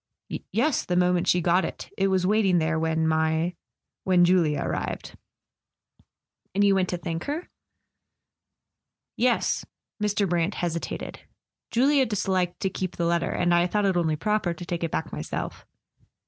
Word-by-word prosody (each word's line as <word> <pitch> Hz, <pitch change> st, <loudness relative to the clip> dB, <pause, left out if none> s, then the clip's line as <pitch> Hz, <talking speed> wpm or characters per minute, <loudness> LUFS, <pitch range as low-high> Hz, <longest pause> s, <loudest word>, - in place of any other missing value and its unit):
"Yes; 305 Hz, -5 st, +1 dB
the 180 Hz, -, -2 dB
moment 180 Hz, 0 st, +2 dB
she 180 Hz, -, +3 dB
got 175 Hz, +2 st, +3 dB
it. -, -, -6 dB
It 195 Hz, -, +1 dB
was 190 Hz, -1 st, +1 dB
waiting 195 Hz, -2 st, +3 dB
there 160 Hz, 0 st, +1 dB
when 160 Hz, 0 st, +1 dB
my—when 160 Hz, +3 st, 0 dB
Julia 165 Hz, -5 st, +2 dB
arrived." -, -, -4 dB, 1.4 s
"And 200 Hz, -, +3 dB
you 200 Hz, -1 st, +5 dB
went 190 Hz, -1 st, +1 dB
to 180 Hz, -, -1 dB
thank 165 Hz, -1 st, -4 dB
her?" 305 Hz, +5 st, -4 dB, 1.7 s
"Yes." 245 Hz, +1 st, +1 dB, 0.4 s
Mr. 210 Hz, -1 st, +1 dB
Brant 175 Hz, +2 st, 0 dB
hesitated. 170 Hz, -1 st, -4 dB, 0.5 s
"Julia 270 Hz, +3 st, +3 dB
disliked 190 Hz, -4 st, -1 dB
to 190 Hz, -, +1 dB
keep 185 Hz, -1 st, -4 dB
the 170 Hz, -, -1 dB
letter. 170 Hz, 0 st, +1 dB
And 175 Hz, -1 st, +1 dB
I 175 Hz, +1 st, +4 dB
thought 210 Hz, +2 st, 0 dB
it 190 Hz, -2 st, +2 dB
only 160 Hz, -3 st, +1 dB
proper 210 Hz, -1 st, 0 dB
to 175 Hz, -, -8 dB
take 170 Hz, -1 st, -3 dB
it 165 Hz, -, 0 dB
back 160 Hz, -, -3 dB
myself." 75 Hz, -, -5 dB
180 Hz, 150 wpm, -26 LUFS, 170-195 Hz, 1.7 s, you